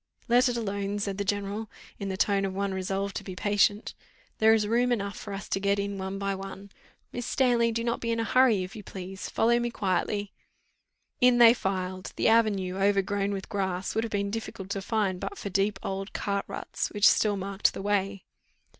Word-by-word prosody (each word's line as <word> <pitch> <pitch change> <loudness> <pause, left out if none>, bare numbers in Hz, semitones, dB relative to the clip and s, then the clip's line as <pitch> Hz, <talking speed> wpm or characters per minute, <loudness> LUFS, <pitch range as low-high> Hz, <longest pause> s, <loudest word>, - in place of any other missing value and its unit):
"Let 245 +2 +4
it 240 - -2
alone," 200 -2 -2
said 200 -1 -3
the - - +1
general, 205 +2 -2 0.3
in 200 -1 -3
the 190 - -3
tone 200 0 +2
of 190 -1 -2
one 200 0 -1
resolved 195 +1 -2
to - - -6
be 185 - -7
patient; 205 +2 +1 0.5
"there 220 0 +6
is 215 -1 +1
room 240 +3 +2
enough 200 -3 -1
for 205 - -8
us 195 0 -6
to - - 0
get 200 +1 +1
in 200 0 -3
one 190 +1 -4
by 200 0 -1
one 195 +1 -8 0.4
Miss 245 0 -5
Stanley, 240 -3 +2
do 230 +1 -2
not 235 0 -1
be 230 - -2
in 230 0 0
a - - +1
hurry, 230 -4 +4
if 185 +5 -8
you 215 - -7
please; 190 -1 -7
follow 235 +1 +3
me 240 0 -1
quietly." 205 -1 -1 0.9
In 250 -1 +5
they 235 -1 +9
filed. 185 -3 -3
The - - +2
avenue, 200 -5 +2
overgrown 200 0 +1
with 195 -1 -4
grass, 190 -2 -2
would 225 - 0
have 230 - -3
been 200 -1 -1
difficult 200 -3 -6
to 195 - -2
find, 200 -3 0
but 405 - -5
for 200 - -5
deep 195 +1 +1
old 195 +1 -4
cart 200 -1 -2
ruts - - -4
which 205 0 +4
still 205 -2 +3
marked 195 +1 +1
the 195 - -5
way. 200 -1 -1
200 Hz, 210 wpm, -28 LUFS, 195-220 Hz, 0.9 s, they